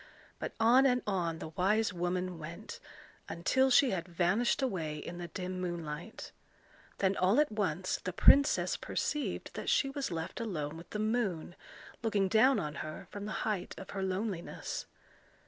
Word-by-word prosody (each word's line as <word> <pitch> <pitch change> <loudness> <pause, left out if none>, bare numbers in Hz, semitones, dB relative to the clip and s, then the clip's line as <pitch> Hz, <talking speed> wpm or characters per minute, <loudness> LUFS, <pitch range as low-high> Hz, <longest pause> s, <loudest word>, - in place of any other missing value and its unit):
But - - -4
on 250 +4 +6
and 250 -1 +2
on 175 -5 -1
the 160 - -6
wise 205 +6 +1
woman 180 0 -2
went, 170 +7 -8 0.5
until 260 +10 +2
she 260 +1 +5
had 175 -2 -2
vanished 185 +10 +1
away 165 -11 -2
in 175 +3 -7
the 175 - -5
dim 185 +2 -5
moonlight. 170 +1 -5 0.7
Then 195 0 +2
all 190 +8 +3
at 300 -4 +3
once 185 -4 -1
the 185 - -2
princess 280 +9 +5
perceived 300 -1 -2
that - - -4
she 275 - +3
was 275 0 -3
left 165 0 -4
alone 160 -9 -3
with 165 +1 -11
the - - -4
moon, 210 -6 -1 0.5
looking 205 -4 +1
down 250 +4 +5
on 150 -5 -3
her 155 0 -7
from 205 0 -6
the 210 - -4
height 205 -5 -2
of 190 - -9
her 195 - -3
loneliness. 190 -1 -3
185 Hz, 165 wpm, -32 LUFS, 170-220 Hz, 0.7 s, on